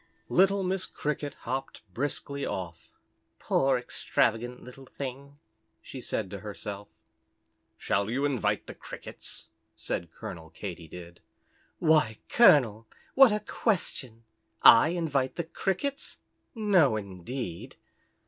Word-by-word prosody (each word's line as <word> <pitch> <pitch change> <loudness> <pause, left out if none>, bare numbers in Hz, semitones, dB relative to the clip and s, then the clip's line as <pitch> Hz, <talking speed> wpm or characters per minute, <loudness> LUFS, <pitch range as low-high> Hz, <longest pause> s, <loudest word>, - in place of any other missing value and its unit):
Little 195 +2 +4
Miss 185 0 -1
Cricket 145 -1 -3
hopped 135 0 -4
briskly 140 +3 -3
off. 85 -3 -5 0.5
"Poor, 135 -1 +2
extravagant 120 0 -1
little 130 +1 -12
thing," 140 +2 -7 0.4
she 130 - -9
said 105 -5 -3
to 100 - -6
herself. 100 0 -6 0.9
"Shall 100 +2 0
you 135 +5 0
invite 105 -7 0
the - - -8
Crickets?" - - -4 0.3
said 85 -1 -4
Colonel 80 0 -8
Katy 85 -1 -7
Did. 85 +1 -11 0.6
"Why, 155 -9 +3
Colonel, 115 - +5 0.3
what 270 -3 +8
a 210 0 0
question! 140 - -1 0.4
I 115 +5 +9
invite 150 -7 0
the 170 - -2
Crickets? 195 - -2 0.3
No, 190 - +4
indeed." 100 0 -6
130 Hz, 110 wpm, -28 LUFS, 105-160 Hz, 0.9 s, I